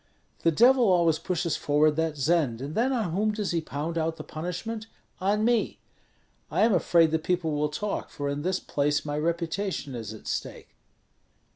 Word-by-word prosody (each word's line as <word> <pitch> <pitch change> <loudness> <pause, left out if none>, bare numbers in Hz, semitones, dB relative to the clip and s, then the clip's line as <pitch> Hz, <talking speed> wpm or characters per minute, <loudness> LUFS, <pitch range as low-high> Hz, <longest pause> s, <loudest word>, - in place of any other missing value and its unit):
The 165 - +3
Devil 245 - +5
always 170 -4 +3
pushes 175 -3 -1
forward 150 +1 +3
that 160 -1 -1
Zend, 145 -5 +1
and 140 +4 -5
then 245 +7 +1
on 225 -9 -1
whom 210 +5 +1
does 210 -2 -2
he 170 -1 0
pound 160 +2 -3
out 160 0 -1
the - - -8
punishment? 180 +7 -5 0.3
On 205 +4 +1
me. 235 -2 +1 0.7
I - - 0
am 225 -1 +4
afraid 170 -2 +4
that 160 -1 0
people 175 -2 0
will 150 0 0
talk, 205 +7 -3
for 145 -1 -4
in 140 +1 -2
this 185 +3 0
place 145 +1 0
my 145 0 -3
reputation 170 -1 -2
is 115 -3 -5
at 110 - -11
stake." - - -5
165 Hz, 180 wpm, -27 LUFS, 150-200 Hz, 0.7 s, Devil